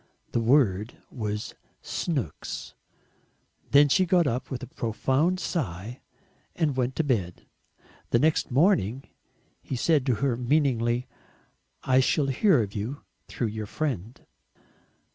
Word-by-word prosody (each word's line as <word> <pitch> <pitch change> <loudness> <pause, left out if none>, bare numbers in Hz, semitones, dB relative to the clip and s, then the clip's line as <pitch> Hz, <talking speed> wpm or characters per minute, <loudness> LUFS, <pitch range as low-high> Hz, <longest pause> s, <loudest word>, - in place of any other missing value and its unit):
The - - +1
word 115 -4 +2
was 105 -3 -4 0.3
"SNOOKS." 135 - -4 1.0
Then 145 +1 +6
she 185 +6 +3
got 175 -2 +4
up 125 -1 -2
with 130 -1 -5
a - - -6
profound 135 +10 0
sigh, 115 - -4 0.5
and 150 -5 0
went 130 0 -1
to 160 - +1
bed. 100 - -2 0.6
The - - +3
next 155 +5 +2
morning 135 - +2 0.6
he 135 - -5
said 145 +1 +2
to 125 - +3
her 135 0 0
meaningly, 125 -2 +1 0.8
"I 130 0 +4
shall 140 +2 +2
hear 145 - +3
of 100 -1 -7
you 115 +8 -5 0.2
through 115 - -2
your 105 0 -5
friend." 120 - -3
130 Hz, 125 wpm, -26 LUFS, 115-145 Hz, 1.0 s, Then